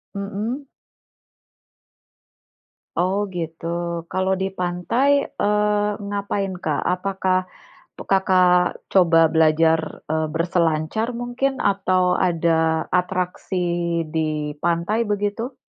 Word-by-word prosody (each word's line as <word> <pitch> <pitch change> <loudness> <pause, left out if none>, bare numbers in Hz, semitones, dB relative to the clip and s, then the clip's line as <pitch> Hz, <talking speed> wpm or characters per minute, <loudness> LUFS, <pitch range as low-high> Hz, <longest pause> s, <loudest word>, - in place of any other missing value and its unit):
Heeh. 210 +7 -4 2.3
Oh 185 +3 +1 0.2
gitu, 165 -1 -5 0.5
kalau 190 +1 +1
di 190 - 0
pantai, 180 +8 0 0.2
eee, 210 0 +1 0.2
ngapain 200 -1 -2
Kak, 155 -4 -2
apakah 185 0 0 0.6
tuk - - -9
Kakak, 180 -2 +4 0.2
coba 175 -4 +5
belajar, 160 0 +4 0.3
eee, 160 0 +1
berselancar 165 +4 0
mungkin, 245 +3 -1
atau 185 -2 +2 0.2
ada 160 -1 +1
atraksi 180 +1 -1 0.6
di 155 -2 -1
pantai, 175 +7 0
begitu? 205 +5 -2
185 Hz, 90 wpm, -22 LUFS, 165-205 Hz, 2.3 s, coba